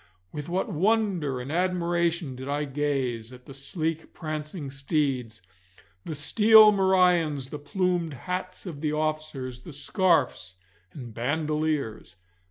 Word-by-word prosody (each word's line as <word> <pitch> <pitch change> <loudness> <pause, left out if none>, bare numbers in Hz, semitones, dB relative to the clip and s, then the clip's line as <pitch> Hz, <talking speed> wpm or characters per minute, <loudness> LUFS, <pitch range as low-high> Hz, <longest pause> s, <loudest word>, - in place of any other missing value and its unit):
With 150 +1 -6
what 185 +6 0
wonder 190 - +1
and 125 +3 -6
admiration 170 -4 0
did 130 +2 -7
I 145 +1 0
gaze 135 -5 -2
at 125 0 -13
the 135 - -10
sleek 160 +4 -3
prancing 155 -2 -5
steeds, 135 - -2 0.6
the 160 - -4
steel 215 +9 +7
morions, 180 -8 +2
the 150 - -5
plumed 175 0 -1
hats 185 +8 -5
of 155 -6 -7
the 150 -1 0
officers, 150 -5 -3
the 165 - -10
scarfs 145 - +1 0.4
and 120 -6 -9
bandoliers. 150 - -2
150 Hz, 125 wpm, -27 LUFS, 135-175 Hz, 0.6 s, steel